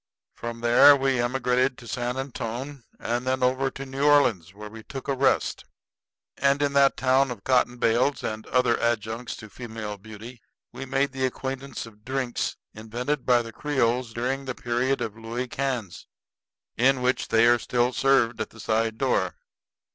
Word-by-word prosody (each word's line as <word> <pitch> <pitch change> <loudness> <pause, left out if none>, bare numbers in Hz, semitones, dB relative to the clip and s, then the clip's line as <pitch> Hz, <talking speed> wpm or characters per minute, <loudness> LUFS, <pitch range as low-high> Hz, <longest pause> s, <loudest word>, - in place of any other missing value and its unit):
From 120 0 -7
there 120 +5 +7
we 135 -2 +1
emigrated 125 +1 +1
to 120 - -12
San 125 +2 -3
Antone, 135 +1 -5 0.2
and 120 +2 -2
then 130 0 0
over 130 +2 +2
to 135 0 -8
New 135 +1 -4
Orleans, 125 - +3
where 105 +2 -10
we 110 +1 -10
took 135 +4 -8
a 140 - +1
rest. 135 0 +1 0.7
And 140 0 +2
in 140 -1 0
that 140 -1 +4
town 130 +1 +3
of 115 -5 -7
cotton 125 -1 +2
bales 120 +4 +1
and 110 0 -4
other 125 -2 +2
adjuncts 115 0 -2
to 110 - -10
female 110 -4 -7
beauty 110 +3 -11 0.3
we 135 - -7
made 135 +1 +1
the 130 -1 0
acquaintance 135 0 -5
of 105 -2 -16
drinks 130 -1 -2 0.2
invented 120 +6 -4
by 120 -1 +4
the 115 -1 -9
Creoles 125 -4 0
during 130 +4 -2
the 130 -2 -4
period 120 +3 -1
of 110 - -3
Louey 115 +3 -4
Cans, 125 -8 -4 0.7
in 130 +1 +3
which 125 +1 +1
they 115 +1 +4
are 120 0 +5
still 120 +1 0
served 120 -5 +2
at 110 - -3
the 110 - -16
side 110 0 0
doors. 95 -9 +1
125 Hz, 170 wpm, -25 LUFS, 115-135 Hz, 0.7 s, there